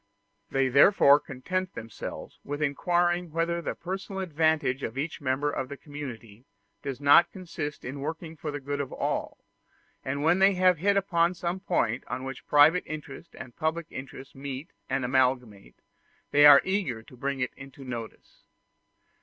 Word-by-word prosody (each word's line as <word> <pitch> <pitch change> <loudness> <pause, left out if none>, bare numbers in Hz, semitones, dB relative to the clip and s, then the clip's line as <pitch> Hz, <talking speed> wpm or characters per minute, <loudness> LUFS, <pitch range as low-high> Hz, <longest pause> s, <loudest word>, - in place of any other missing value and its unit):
They 135 0 +1
therefore 140 +2 +6
content 180 +7 -4
themselves 115 -2 -8
with 145 +1 -5
inquiring 175 +4 +1
whether 170 +1 -1
the - - -4
personal 190 +2 -5
advantage 155 -5 +1
of 115 0 -5
each 155 +3 -3
member 140 +2 0
of 135 -2 -4
the 140 - -7
community 125 -7 -9 0.4
does 135 -2 -5
not 145 +4 +6
consist 165 -5 -6
in 135 +3 -5
working 160 +3 -5
for 155 0 -6
the 145 0 -4
good 145 +1 -3
of 135 - -6
all; - - -2 0.7
and 140 +2 -3
when 170 +4 +3
they 195 0 +5
have 180 -2 +4
hit 200 +3 +2
upon 175 -2 +2
some 175 +1 -3
point 140 - 0
on 125 +1 -4
which 135 -1 -7
private 150 +5 +5
interest 155 +1 -8
and 125 -3 -10
public 160 +1 -1
interest 135 +1 -9
meet 135 +3 -7 0.2
and 130 - 0
amalgamate, 125 - 0 0.6
they 145 0 +8
are 140 -1 +9
eager 180 - -2
to 125 - -16
bring 135 +2 -3
it 125 - -2
into 135 0 -12
notice. 120 -4 -8
145 Hz, 160 wpm, -27 LUFS, 130-170 Hz, 0.7 s, are